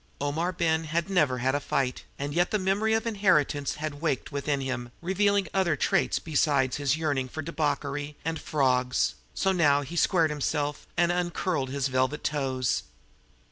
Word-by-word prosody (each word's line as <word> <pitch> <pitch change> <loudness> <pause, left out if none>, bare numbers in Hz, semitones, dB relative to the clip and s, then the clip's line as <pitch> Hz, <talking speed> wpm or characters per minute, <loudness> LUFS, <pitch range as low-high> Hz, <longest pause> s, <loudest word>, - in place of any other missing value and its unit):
Omar 155 +5 -1
Ben 165 -2 0
had 170 +4 -1
never 150 -9 +3
had 130 +2 +1
a 145 - +1
fight, 135 -2 -1
and 145 +1 -3
yet 175 +2 +2
the 215 - +1
memory 200 +3 +1
of 225 - -1
inheritance 170 -10 +2
had 150 -1 -5
waked 150 -5 -1
within 140 0 -1
him, 130 -3 -4
revealing 200 +2 +1
other 185 -5 +2
traits - - +1
besides 140 -4 +1
his 145 0 +1
yearning 140 -5 -1
for 155 +5 -5
debauchery 145 -2 -2
and 160 -1 -2
"frawgs"; 125 -3 +1 0.2
so 190 - +2
now 145 -6 +4
he 145 +5 -7
squared 165 -2 +3
himself 150 0 -2
and 175 0 +3
uncurled 175 -5 -1
his 140 0 -1
velvet 130 +2 0
toes. 130 -4 0
150 Hz, 165 wpm, -27 LUFS, 140-170 Hz, 0.2 s, now